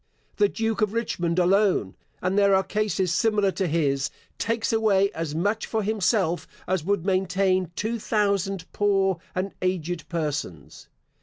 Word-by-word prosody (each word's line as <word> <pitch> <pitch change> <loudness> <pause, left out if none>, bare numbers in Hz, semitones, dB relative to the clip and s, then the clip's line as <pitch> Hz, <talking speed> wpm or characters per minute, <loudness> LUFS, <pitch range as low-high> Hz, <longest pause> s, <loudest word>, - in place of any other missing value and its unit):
The 410 - +4
Duke 225 -1 -2
of 210 -1 +1
Richmond 175 -7 -1
alone 185 - +2 0.3
(and 185 +1 +1
there 200 -1 +5
are 190 - +3
cases 195 -3 0
similar 205 +1 +2
to 190 -1 -1
his) 145 -3 +1 0.3
takes 230 +1 0
away 200 -3 +3
as 160 -2 -4
much 205 +6 0
for 220 -1 -1
himself 195 -4 +1 0.2
as 185 -3 0
would 195 -1 0
maintain 185 -1 +1
two 230 +2 -2
thousand 200 -4 0
poor 195 -3 +2 0.2
and 185 +2 -2
aged 175 -2 -2
persons. 145 - -4
190 Hz, 145 wpm, -25 LUFS, 175-210 Hz, 0.3 s, there